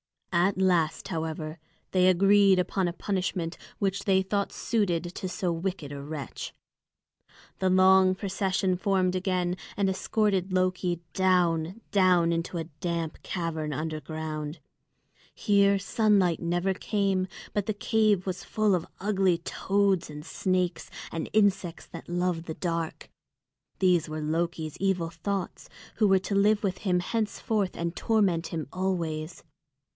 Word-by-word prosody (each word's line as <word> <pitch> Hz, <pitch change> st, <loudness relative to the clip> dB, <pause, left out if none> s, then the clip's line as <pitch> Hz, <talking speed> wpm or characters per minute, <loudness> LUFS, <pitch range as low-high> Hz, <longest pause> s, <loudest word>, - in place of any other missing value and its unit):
At 180 Hz, +3 st, +3 dB
last, 175 Hz, -4 st, +1 dB
however, 160 Hz, -2 st, -4 dB, 0.3 s
they 185 Hz, -1 st, +4 dB
agreed 195 Hz, +1 st, +5 dB
upon 185 Hz, 0 st, 0 dB
a 170 Hz, -, -2 dB
punishment 180 Hz, -3 st, -2 dB, 0.2 s
which 195 Hz, 0 st, -1 dB
they 190 Hz, -1 st, +4 dB
thought 200 Hz, +1 st, -1 dB
suited 190 Hz, -8 st, 0 dB
to 185 Hz, -, -4 dB
so 180 Hz, -1 st, -1 dB
wicked 170 Hz, -3 st, -3 dB
a 140 Hz, -1 st, -6 dB
wretch. 145 Hz, 0 st, -6 dB, 1.1 s
The 190 Hz, -, +2 dB
long 185 Hz, 0 st, +5 dB
procession 190 Hz, -1 st, 0 dB
formed 185 Hz, -2 st, +1 dB
again 185 Hz, -1 st, 0 dB, 0.2 s
and 200 Hz, -1 st, +2 dB
escorted 190 Hz, -1 st, 0 dB
Loki 185 Hz, -2 st, 0 dB
down, 180 Hz, 0 st, +2 dB
down 180 Hz, -4 st, +4 dB
into 170 Hz, +1 st, -2 dB
a 165 Hz, -, -2 dB
damp 165 Hz, 0 st, -4 dB
cavern 160 Hz, -4 st, -3 dB
underground. 155 Hz, 0 st, -4 dB, 0.8 s
Here 200 Hz, -1 st, +3 dB
sunlight 200 Hz, -3 st, +2 dB
never 175 Hz, +3 st, 0 dB
came, 195 Hz, -2 st, 0 dB, 0.3 s
but 205 Hz, -1 st, -1 dB
the 215 Hz, -, +1 dB
cave 210 Hz, -2 st, +2 dB
was 185 Hz, -1 st, -4 dB
full 215 Hz, -2 st, +1 dB
of 175 Hz, -2 st, 0 dB
ugly 190 Hz, -3 st, +2 dB
toads, 195 Hz, +1 st, 0 dB, 0.2 s
snakes, 185 Hz, -1 st, -1 dB, 0.2 s
and 165 Hz, -, -4 dB
insects 200 Hz, -5 st, +1 dB
that 165 Hz, -, -10 dB
love 175 Hz, -1 st, -1 dB
the 160 Hz, -, -5 dB
dark. 165 Hz, -2 st, -3 dB, 0.7 s
These 175 Hz, -4 st, +3 dB
were 155 Hz, 0 st, -4 dB
Loki's 160 Hz, 0 st, -2 dB
evil 190 Hz, -4 st, 0 dB
thoughts, 185 Hz, +3 st, -4 dB, 0.3 s
who 215 Hz, -, +4 dB
were 195 Hz, -1 st, +5 dB
to 190 Hz, -, -4 dB
live 205 Hz, +2 st, +3 dB
with 185 Hz, -2 st, -1 dB
him 180 Hz, -3 st, +1 dB
henceforth 215 Hz, -1 st, -1 dB
and 170 Hz, +1 st, -2 dB
torment 195 Hz, -7 st, +1 dB
him 160 Hz, -3 st, -4 dB
always. 170 Hz, -4 st, -2 dB
185 Hz, 135 wpm, -28 LUFS, 165-195 Hz, 1.1 s, agreed